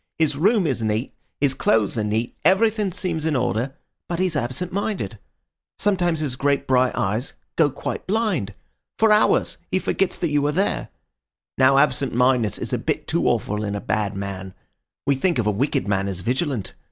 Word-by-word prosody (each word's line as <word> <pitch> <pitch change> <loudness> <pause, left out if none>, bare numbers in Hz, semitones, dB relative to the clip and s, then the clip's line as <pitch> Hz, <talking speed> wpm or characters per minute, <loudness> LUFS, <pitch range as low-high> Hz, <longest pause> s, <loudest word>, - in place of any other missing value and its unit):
His 155 -3 +2
room 200 +6 +3
is 135 -6 0
neat, 110 +3 -1 0.3
his 140 -2 +2
clothes 110 -4 +2
are 110 - 0
neat, 110 +3 -1
everything 205 +3 +3
seems 170 -4 -3
in 160 -2 +1
order; 125 +2 -1 0.3
but 170 - -1
he's 185 -2 0
absent 145 +8 -2
minded. 185 - -2 0.6
Sometimes 175 -5 +1
his 140 -5 -1
great 140 0 +1
bright 130 -1 +2
eyes 110 +7 -1 0.2
go 155 -3 +4
quite 140 - -5
blind. 185 - 0 0.4
For 220 -1 +4
hours 210 0 +3
he - - +1
forgets 190 0 0
that 170 - -1
you 145 -1 +2
are - - +1
there. 190 +6 0 0.7
Now 135 +1 +5
absent 135 -2 +2
mindedness 125 -4 +2
is - - -5
just - - -4
a - - +2
bit - - -2
too - - +1
awful 105 +1 0
in 100 -1 -2
a - - -2
bad 105 -1 -1
man. 95 -1 -6 0.5
We 140 - +3
think 155 +4 +1
of 115 - +1
a 105 - +3
wicked 135 +4 0
man 100 -1 0
as 95 -2 -3
vigilant. 130 - -1
135 Hz, 190 wpm, -23 LUFS, 110-175 Hz, 0.7 s, Now